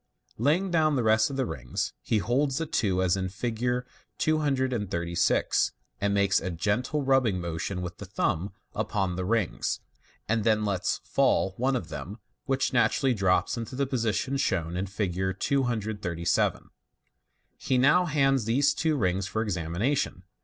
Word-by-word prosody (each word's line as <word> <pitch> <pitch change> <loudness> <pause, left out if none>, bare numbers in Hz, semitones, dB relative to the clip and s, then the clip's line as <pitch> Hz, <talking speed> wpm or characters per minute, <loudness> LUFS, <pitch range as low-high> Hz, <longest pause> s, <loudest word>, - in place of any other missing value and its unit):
" - - -40
Laying 165 - +2
down 155 -3 +3
the 125 - +1
rest 110 0 +4
of 140 - -5
the 135 -1 0
rings, 65 - -3
he 110 - 0
holds 130 +6 +1
the 165 - -1
two 95 -10 +1
as 90 0 +3
in 95 -1 -2
Fig. 120 +5 -2 0.3
236, 125 - +1 0.3
and 100 0 +1
makes 100 -1 +3
a 95 - -3
gentle 105 - -1
rubbing 130 -8 +2
motion 85 +2 -3
with 90 0 -7
the 100 - -8
thumb 95 -1 -1 0.2
upon 95 -3 -1
the 90 - -2
rings, 110 -3 0 0.5
and 115 0 +1
then 110 -1 +2
lets 100 -3 -1
fall 95 - +2
one 130 +2 +1
of 125 - -3
them, 80 +7 -6 0.3
which 135 -1 0
naturally 125 +3 +3
drops 95 -4 +2
to 115 +2 -5
the 140 +1 +1
position 130 +1 -1
shown 85 -9 -1
in 95 +2 -2
Fig. 95 -1 -2
237. 110 -10 0 0.9
He 130 - +1
now 150 +8 +5
hands 135 -6 +2
these 135 +6 +3
two 160 -1 0
rings 95 -3 0
for 110 +1 -1
examination. 90 - -1
110 Hz, 155 wpm, -27 LUFS, 95-130 Hz, 0.9 s, now